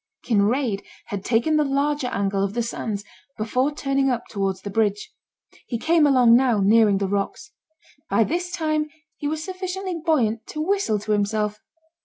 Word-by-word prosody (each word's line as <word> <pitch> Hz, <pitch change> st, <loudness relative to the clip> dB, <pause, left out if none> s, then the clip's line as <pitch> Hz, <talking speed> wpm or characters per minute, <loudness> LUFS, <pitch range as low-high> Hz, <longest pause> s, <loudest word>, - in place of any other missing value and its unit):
Kinraid 220 Hz, 0 st, +1 dB, 0.3 s
had 200 Hz, -2 st, -4 dB
taken 245 Hz, +9 st, +2 dB
the 300 Hz, -, +3 dB
larger 280 Hz, 0 st, 0 dB
angle 200 Hz, -4 st, -1 dB
of 200 Hz, +2 st, -2 dB
the 240 Hz, -, 0 dB
sands 215 Hz, -3 st, -4 dB, 0.3 s
before 250 Hz, +6 st, 0 dB
turning 275 Hz, -2 st, 0 dB
up 240 Hz, -2 st, -1 dB
towards 195 Hz, -2 st, -2 dB
the 200 Hz, -, -5 dB
bridge. 210 Hz, -1 st, 0 dB, 0.5 s
He 235 Hz, -, -2 dB
came 315 Hz, +4 st, +3 dB
along 250 Hz, -4 st, +6 dB
now 245 Hz, -4 st, +3 dB
nearing 210 Hz, 0 st, +4 dB
the 195 Hz, 0 st, -1 dB
rocks. 200 Hz, +9 st, -3 dB, 0.6 s
By 225 Hz, -, +4 dB
this 350 Hz, -, -2 dB
time 310 Hz, -3 st, -1 dB, 0.3 s
he 290 Hz, -, -3 dB
was 310 Hz, +1 st, -2 dB
sufficiently 370 Hz, -1 st, -4 dB
buoyant 230 Hz, -9 st, +1 dB
to 305 Hz, -, -6 dB
whistle 360 Hz, -, +1 dB
to 210 Hz, +1 st, -4 dB
himself. 210 Hz, 0 st, 0 dB
240 Hz, 165 wpm, -23 LUFS, 210-300 Hz, 0.6 s, along